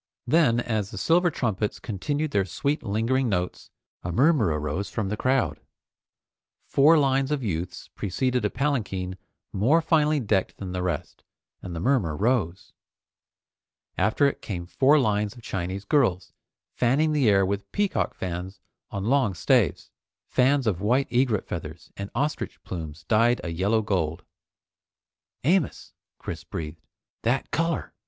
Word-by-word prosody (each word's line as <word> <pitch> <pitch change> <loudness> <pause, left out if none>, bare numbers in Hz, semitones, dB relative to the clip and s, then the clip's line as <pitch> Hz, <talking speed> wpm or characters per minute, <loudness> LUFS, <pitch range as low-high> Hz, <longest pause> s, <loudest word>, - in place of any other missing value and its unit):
Then, 125 -3 +3
as 110 -4 -1
the - - -8
silver 175 +2 +3
trumpets 110 - -2
continued 145 +8 -2
their 100 - +2
sweet 140 - -2
lingering 115 +5 0
notes, 90 -3 -2 0.3
a 90 - -4
murmur 135 - +4
arose 75 +5 -2
from 105 -3 -2
the 105 - -1
crowd. 110 - +1 1.1
Four 155 +4 +5
lines 135 -2 +2
of 150 -3 -1
youths 90 -3 -4
preceded 125 +5 -1
a 105 - +2
palanquin 105 -10 -2 0.4
more 125 - +4
finely 155 -2 +2
decked 105 -6 0
than 95 -2 -6
the 90 0 -2
rest, 90 -4 -4 0.4
and 90 -2 -6
the - - -3
murmur 100 - +1
rose. 100 -6 0 1.2
After 110 +6 +2
it 140 - 0
came 90 -4 -5
four 135 - +4
lines 105 -5 +1
of 120 - -14
Chinese 95 +1 -4
girls, 100 - +1 0.4
fanning 140 +6 +2
the 145 -7 +3
air 95 -1 +4
with 100 +1 -3
peacock 205 -1 0
fans 90 +2 -5 0.3
on 100 0 -4
long 125 -5 +2
staves, - - +1 0.3
fans 135 +1 +2
of 95 -5 0
white 125 +6 +1
egret 120 -4 +2
feathers, 80 -1 -7
and 100 0 -6
ostrich 150 +2 -2
plumes 80 -3 -7
dyed 115 +7 +3
a 85 - -3
yellow 100 +7 +1
gold. 85 -5 -1 1.2
"Amos!" 165 +1 0 0.2
Chris - - -6
breathed, 80 0 -6 0.4
"That 120 +4 0
color! 165 0 -1
110 Hz, 145 wpm, -26 LUFS, 95-135 Hz, 1.2 s, Four